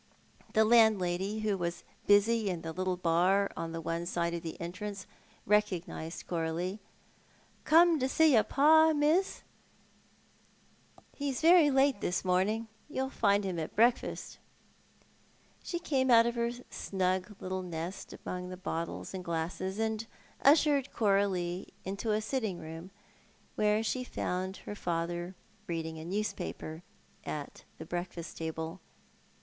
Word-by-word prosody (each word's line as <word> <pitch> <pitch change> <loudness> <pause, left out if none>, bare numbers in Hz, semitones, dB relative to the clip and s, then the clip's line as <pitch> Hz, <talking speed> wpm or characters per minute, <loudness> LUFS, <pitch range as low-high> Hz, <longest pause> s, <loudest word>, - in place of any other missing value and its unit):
The 220 -1 +5
landlady, 210 -3 +3
who 215 -2 +1
was 170 0 -3 0.2
busy 205 +1 +4
in 175 -3 -4
the 165 - -4
little 185 0 -1
bar 180 +4 +2
on 165 0 -4
one 165 +1 -2
side 170 -1 -1
of 170 - -3
the 165 -1 -7
entrance, 190 +3 -5 0.4
recognised 185 -5 -1
Coralie. 170 +4 -2 0.9
"Come 330 +1 +6
to 260 0 0
see 315 +1 +4
your 225 - +7
pa, 315 +6 +5
miss? 310 +6 +1 1.8
ixo^a 280 -2 -2
very 330 -2 +7
late 270 -4 +3
this 180 +2 -1
morning. 200 +5 +1 0.2
You'll 265 -2 -2
find 200 -4 +2
him 185 -3 -2
at 160 - -5
breakfast." 235 +3 +1 1.2
She 345 - -3
came 275 -6 0
out 230 -1 +7
of 235 - 0
her 235 0 0 0.2
snug 185 +1 -1
little 185 0 -3
nest 175 +1 -6
among 180 0 -4
the 185 - -7
bottles 170 -1 -4
and 185 -1 -5
glasses, 170 +3 -3
and 220 0 -1 0.3
ushered 285 -2 +4
Coralie 195 -4 0
into 200 +4 -2
a 215 +1 +1
sitting 215 -5 -2
room 165 +3 -8 0.6
where 210 +1 +2
she 255 +3 -1
found 185 -5 -3
her - - -5
father 175 -1 -3 0.3
reading 160 -1 -4
a 160 - -8
newspaper 180 -4 -4 0.4
at 145 -2 -6
the 160 - -8
breakfast 175 0 -5
table. 160 +2 -5
195 Hz, 135 wpm, -31 LUFS, 175-230 Hz, 1.8 s, your